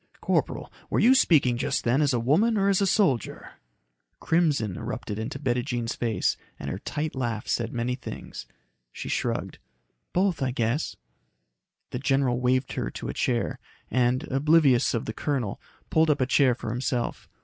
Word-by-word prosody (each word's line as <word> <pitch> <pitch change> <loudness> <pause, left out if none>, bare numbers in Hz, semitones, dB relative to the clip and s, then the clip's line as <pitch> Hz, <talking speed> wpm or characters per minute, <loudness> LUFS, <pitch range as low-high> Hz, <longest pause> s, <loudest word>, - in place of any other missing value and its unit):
"Corporal, - - -1 0.2
were - - +1
you 250 - +6
speaking 145 - +4
just - - -1
then 125 +5 +2
as 145 -2 +3
a 125 - +1
woman 185 - +3
or 200 0 +3
as 195 0 +2
a 195 - +3
soldier?" 180 - +1 0.7
Crimson 150 - +1
erupted 110 +2 -5
into 110 - -4
Bettijean's 120 -3 -1
face 115 -3 0 0.2
and 70 - -5
her 95 - -4
tight 155 +6 -3
laugh 120 -5 -2
said 115 -1 -1
many 120 +1 -1
things. 125 - -8 0.4
She - - -7
shrugged. - - -2 0.5
"Both 185 -3 +1
I 130 - +1
guess." 120 +4 -1 1.0
The 125 - -3
general 135 -2 +1
waved 130 +1 +1
her - - -2
to - - -6
a - - -3
chair 120 -2 -1 0.3
and, 125 0 +2
oblivious 135 -3 +4
of 115 - -2
the 110 - -4
colonel, 130 -6 -2 0.3
pulled 160 0 +4
up 150 - +2
a - - +4
chair 130 -1 +3
for 115 -2 -5
himself. 125 0 -2
130 Hz, 165 wpm, -26 LUFS, 120-150 Hz, 1.0 s, you